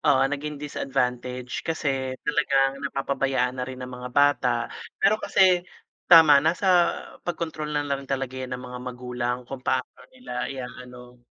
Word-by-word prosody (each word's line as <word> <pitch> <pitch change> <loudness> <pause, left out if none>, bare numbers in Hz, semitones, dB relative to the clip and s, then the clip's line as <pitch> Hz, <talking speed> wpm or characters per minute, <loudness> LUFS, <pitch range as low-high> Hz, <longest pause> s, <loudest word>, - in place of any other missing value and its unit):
oo 140 -3 +4
naging 150 +1 -4
disadvantage 125 -3 -3
kasi 135 -5 -2
talagang 140 -2 +2
napapabayaan 135 -2 0
na 125 - -2
rin 130 0 -7
ng 125 - -9
mga 125 0 -7
bata. 145 -1 +3 0.5
Pero 215 +1 +3
kasi 185 -2 +4 0.5
tama. 155 -4 +9
nasa 170 +5 +1 0.6
pagkontrol 160 -3 -4
na 145 -1 0
rin 135 -1 -8
talaga 135 -1 -2
yan 130 - -5
ng 125 - -10
mga 125 0 -7
magulang 125 -1 -3
kung 135 0 -7
paano 130 -1 -2
nila 250 - -5
iaano. 125 -1 -9
135 Hz, 145 wpm, -25 LUFS, 125-150 Hz, 0.6 s, tama